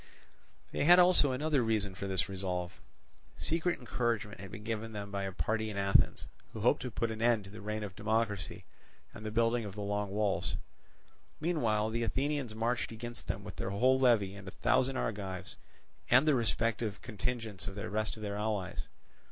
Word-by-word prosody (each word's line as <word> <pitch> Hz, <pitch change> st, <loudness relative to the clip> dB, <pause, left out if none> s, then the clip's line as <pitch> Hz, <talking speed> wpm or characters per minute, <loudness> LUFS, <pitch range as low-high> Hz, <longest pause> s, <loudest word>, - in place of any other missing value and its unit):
They -, -, 0 dB
had 175 Hz, +3 st, +9 dB
also 180 Hz, -6 st, +6 dB
another 145 Hz, +1 st, +1 dB
reason 110 Hz, -4 st, 0 dB
for 100 Hz, +2 st, -5 dB
this 95 Hz, -2 st, +1 dB
resolve. 90 Hz, -2 st, -3 dB, 0.6 s
Secret 170 Hz, +2 st, 0 dB
encouragement 115 Hz, -4 st, -1 dB
had 100 Hz, 0 st, -8 dB
been 105 Hz, -, -8 dB
given 110 Hz, 0 st, -3 dB
them 100 Hz, -1 st, -5 dB
by 100 Hz, -1 st, -2 dB
a 95 Hz, -, -3 dB
party 110 Hz, +3 st, -1 dB
in 105 Hz, -, -5 dB
Athens, 100 Hz, 0 st, +3 dB, 0.3 s
who -, -, -5 dB
hoped -, -, +3 dB
to 125 Hz, -, -3 dB
put 115 Hz, 0 st, -1 dB
an 110 Hz, 0 st, -5 dB
end 115 Hz, -3 st, +3 dB
to 95 Hz, -, -11 dB
the 105 Hz, -, -9 dB
reign 105 Hz, +1 st, -3 dB
of 95 Hz, -3 st, -6 dB
democracy 105 Hz, -2 st, -1 dB, 0.5 s
and -, -, -9 dB
the 110 Hz, -, -3 dB
building 115 Hz, +2 st, +2 dB
of 100 Hz, -2 st, -7 dB
the 105 Hz, -, -5 dB
Long 100 Hz, 0 st, -1 dB
Walls. 100 Hz, 0 st, 0 dB, 0.8 s
Meanwhile 115 Hz, -10 st, +1 dB
the 115 Hz, +1 st, -1 dB
Athenians 135 Hz, -1 st, -1 dB
marched 115 Hz, +2 st, 0 dB
against 120 Hz, +1 st, -7 dB
them -, -, -3 dB
with -, -, -8 dB
their -, -, -2 dB
whole 130 Hz, +7 st, +3 dB
levy 115 Hz, -7 st, +4 dB
and 100 Hz, -1 st, -10 dB
a -, -, -3 dB
thousand 130 Hz, +7 st, +2 dB
Argives 95 Hz, -3 st, -3 dB, 0.5 s
and 130 Hz, +5 st, +6 dB
the 150 Hz, -, +6 dB
respective 115 Hz, -3 st, 0 dB
contingents 110 Hz, -3 st, -3 dB
of 100 Hz, -, -5 dB
the 100 Hz, -, -4 dB
rest 110 Hz, +1 st, -1 dB
of 110 Hz, -, -8 dB
their 100 Hz, 0 st, -3 dB
allies. 105 Hz, -3 st, -2 dB
110 Hz, 190 wpm, -32 LUFS, 100-120 Hz, 0.8 s, had